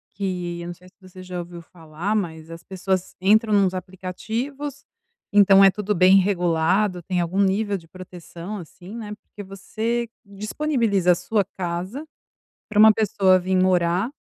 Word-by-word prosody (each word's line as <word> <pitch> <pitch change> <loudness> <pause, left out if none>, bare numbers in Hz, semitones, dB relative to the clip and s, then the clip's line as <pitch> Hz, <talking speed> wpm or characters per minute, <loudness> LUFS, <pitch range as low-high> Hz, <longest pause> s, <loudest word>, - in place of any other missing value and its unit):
que 180 -3 -4
eu 170 - -7
não 175 - -5
sei 180 +1 -19
se 185 - -21
você 185 0 -13
já 180 -1 -6
ouviu 170 0 -8
falar, 165 +5 -5
mas 160 -5 -4
as 165 +1 -10
pessoas 190 -1 -3
entram 215 +3 +3
em - - +5
uns 185 - -1
aplicativos, 225 +11 -5 0.5
então, 195 -1 +7
é 195 - +7
tudo 210 0 -2
bem 185 +2 +6
regulado, 180 0 +1
tem 180 0 -2
algum 180 +4 0
nível 200 +1 +1
de 165 -2 -16
proteção, 180 +2 -9
assim, 180 +4 -11
né, 210 -3 -6
porque 205 - -13
você 225 +5 -3 0.2
disponibiliza 210 - 0
a - - -1
sua 210 +3 0
casa 185 - -4 0.6
pra 215 - -4
uma 220 0 +8
pessoa 195 -3 +3
vim 185 +1 0
morar, 185 +4 +2
190 Hz, 165 wpm, -23 LUFS, 175-210 Hz, 0.6 s, uma